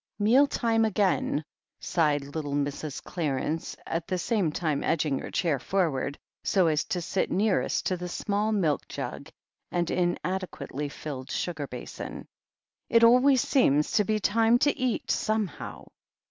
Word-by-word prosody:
"Meal 240 +8 +5
time 225 -4 +1
again!" 195 -7 +1 0.3
sighed 150 -4 +1
little 145 -3 -3
Mrs. 145 0 -3
Clarence, 155 -1 -2
at 165 0 -3
the 185 -1 -1
same 185 -3 0
time 155 -3 -1
edging 150 -4 +1
her - - -6
chair 160 -7 0
forward, 145 -6 -1 0.3
so 190 -3 +3
as 155 -2 +2
to 180 - -2
sit 185 +1 -1
nearest 205 +1 +1
to 185 - +1
the 180 0 -5
small 205 +4 -1
milk 175 -9 +1
jug - - -6 0.4
and 175 -1 0
inadequately 175 -5 -2
filled 140 -2 -7
sugar 150 -5 -3
basin. 125 - -7 0.6
"It 230 0 +5
always 250 +3 +6
seems 150 - +3
to 210 - +3
be 215 +1 0
time 225 +3 +3
to 290 - +2
eat, 255 -3 -1
some 215 0 +1
how." 165 - -9
180 Hz, 145 wpm, -27 LUFS, 150-215 Hz, 0.6 s, always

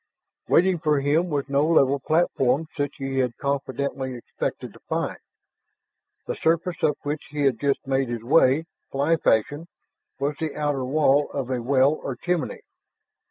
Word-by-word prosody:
Waiting 180 0 +4
for 150 -3 +2
him 150 +6 +1
was 145 -3 -1
no 140 +1 +2
level 140 -4 +3
platform 145 -2 +1
such 145 -1 -2
as 135 - -4
he 135 0 -1
had 125 -2 0
confidently 135 -1 -2
expected 120 - -5
to - - -16
find. - - -2 1.1
The - - -2
surface 165 +1 0
up 150 - +2
which 145 +1 -2
he 145 0 -2
had 130 -5 +2
just 140 -1 0
made 135 -1 0
his 120 -2 -4
way 145 +2 +4 0.3
fly 145 +4 +2
fashion 145 +7 +1 0.5
was 140 +2 -1
the 160 -2 -3
outer 145 -3 -1
wall 145 +1 +3
of 135 -2 -4
a 125 -2 -1
well 135 +2 +3
or 135 - -4
chimney. 175 +6 -2
140 Hz, 160 wpm, -24 LUFS, 135-155 Hz, 1.1 s, Waiting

